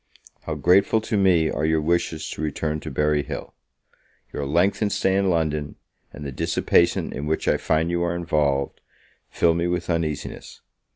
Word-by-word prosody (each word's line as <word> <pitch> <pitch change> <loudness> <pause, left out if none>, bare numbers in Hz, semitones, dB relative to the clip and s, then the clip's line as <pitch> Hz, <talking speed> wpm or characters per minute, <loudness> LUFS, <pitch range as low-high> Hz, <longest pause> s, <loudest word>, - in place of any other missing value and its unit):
How - - -3
grateful 100 +5 +4
to 110 - -3
me 90 -5 +3
are 75 - -2
your 80 0 +2
wishes 80 0 -1
to - - -6
return 75 0 -2
to 80 - -7
Berry 75 +1 +1
Hill! - - -7 0.8
Your 70 - -3
lengthened 95 +7 +1
stay 95 0 +1
in 100 -1 +2
London, 75 -4 -1 0.4
and 75 - -9
the 70 - -4
dissipation 85 +5 +1
in 75 - -4
which 80 - -1
I - - +3
find 80 +2 0
you 85 0 0
are 85 0 0
involved, 75 -5 0 0.5
fill 85 - +2
me 85 +1 0
with 90 0 -2
uneasiness. 80 -3 -4
80 Hz, 170 wpm, -23 LUFS, 75-85 Hz, 0.8 s, grateful